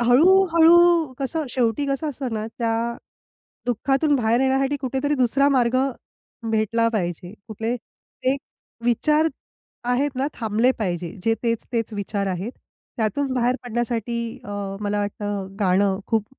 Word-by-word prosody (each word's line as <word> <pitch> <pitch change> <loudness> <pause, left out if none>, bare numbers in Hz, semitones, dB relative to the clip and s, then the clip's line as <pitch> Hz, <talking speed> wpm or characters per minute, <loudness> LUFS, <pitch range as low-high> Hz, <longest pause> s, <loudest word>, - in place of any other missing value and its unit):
हळू-हळू 335 +3 +5
कसं 285 +2 -2
शेवटी 245 +2 0
कसं 275 +3 -1
असतं 260 -4 -4
ना 215 0 -3
त्या 230 -2 +1 0.9
दुःखातून 270 +5 +1
बाहेर 235 -1 +2
येण्यासाठी 270 +1 +2
कुठेतरी 270 +2 -1
दुसरा 270 +2 +3
मार्ग 255 -3 +2 0.7
भेटला 225 +1 +2
पाहिजे. 180 -3 -3
कुठले 225 +3 -2
ते 260 +2 -4 0.5
विचार 300 +7 +3 0.6
आहेत 275 +4 +2
ना 265 +2 0
थांबले 225 +2 +2
पाहिजे. 175 -5 -2
जे 225 +3 +2
तेच 230 -1 0
तेच 230 -1 -1
विचार 200 0 -2
आहेत. 190 +5 -3 0.4
त्यातून 260 +4 0
बाहेर 250 0 +2
पडण्यासाठी 235 -1 -2 0.3
अ, - - -8 0.3
मला 205 0 -1
वाटतं 205 -1 -3
गाणं 190 0 +2
खूप 220 -3 +1
240 Hz, 130 wpm, -23 LUFS, 215-275 Hz, 0.9 s, हळू-हळू